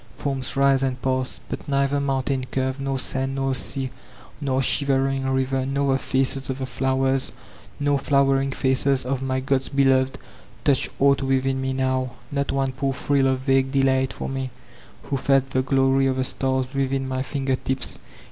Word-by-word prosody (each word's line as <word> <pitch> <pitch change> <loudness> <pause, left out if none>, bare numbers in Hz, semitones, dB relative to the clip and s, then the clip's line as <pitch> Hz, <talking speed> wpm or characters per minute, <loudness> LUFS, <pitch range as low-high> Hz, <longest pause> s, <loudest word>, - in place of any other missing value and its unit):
Forms 135 -2 -1
rise 135 -1 +4
and 130 -1 -1
pass; 130 0 -1
but - - -6
neither 140 0 +1
mountain 135 -1 -1
curve 130 +1 -2
nor 135 -1 -1
sand 130 +1 -1
nor 135 0 0
sea* 130 0 0 0.5
nor 135 -2 +1
shivering 135 -1 +1
river, 130 0 0
nor 135 0 0
the 135 - +1
faces 135 +1 0
of 130 - -2
the 135 - -3
flowers, 130 +2 0 0.5
nor 145 -1 +2
flowering 135 -1 +2
faces 130 0 +1
of 130 0 -2
my 130 0 -1
god's 135 0 0
beloved, 135 -1 +2 0.5
touch 140 -3 +2
anght 140 0 +4
witUn 135 0 +1
me 130 0 -2
now. 130 -1 -1 0.2
Not 140 -1 -1
one 135 -1 0
poor 135 +1 -2
thrill 140 0 +1
of 130 -1 0
vague 135 0 +2
deUgfat 135 -1 +2
for - - -5
me, 135 -1 -3 0.5
who 140 - -2
feh 135 +1 +3
the 130 -1 0
glory 135 0 +2
of 130 - +1
the 130 - 0
stars 130 0 -1
within 135 0 -1
my 130 0 -2
finger 135 -1 -1
tips. 130 0 -3
135 Hz, 175 wpm, -23 LUFS, 130-135 Hz, 0.5 s, rise